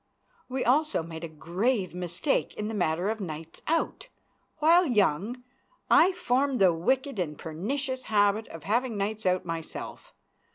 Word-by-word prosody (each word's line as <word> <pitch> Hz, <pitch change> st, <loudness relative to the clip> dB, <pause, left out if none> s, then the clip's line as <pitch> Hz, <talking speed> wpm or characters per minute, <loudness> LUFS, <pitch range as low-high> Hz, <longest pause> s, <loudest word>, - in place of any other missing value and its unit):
We 255 Hz, 0 st, -2 dB
also 295 Hz, -, +2 dB
made 160 Hz, 0 st, -8 dB
a -, -, -3 dB
grave 185 Hz, -, -1 dB
mistake 180 Hz, -, -1 dB
in 210 Hz, 0 st, -3 dB
the -, -, -4 dB
matter 180 Hz, 0 st, 0 dB
of 220 Hz, -, -4 dB
nights 160 Hz, -2 st, -7 dB
out. 330 Hz, +9 st, -1 dB, 0.5 s
While 335 Hz, +3 st, +5 dB
young, 210 Hz, -, +1 dB, 0.5 s
I 365 Hz, -, +7 dB
formed 275 Hz, -6 st, +1 dB
the 190 Hz, -5 st, +5 dB
wicked 260 Hz, -, 0 dB
and 150 Hz, -4 st, -2 dB
pernicious 260 Hz, -, -3 dB
habit 205 Hz, 0 st, +2 dB
of 165 Hz, -2 st, -10 dB
having 230 Hz, +4 st, 0 dB
nights 205 Hz, 0 st, -2 dB
out 185 Hz, 0 st, +1 dB
myself. 165 Hz, -2 st, -6 dB
210 Hz, 150 wpm, -28 LUFS, 170-260 Hz, 0.5 s, I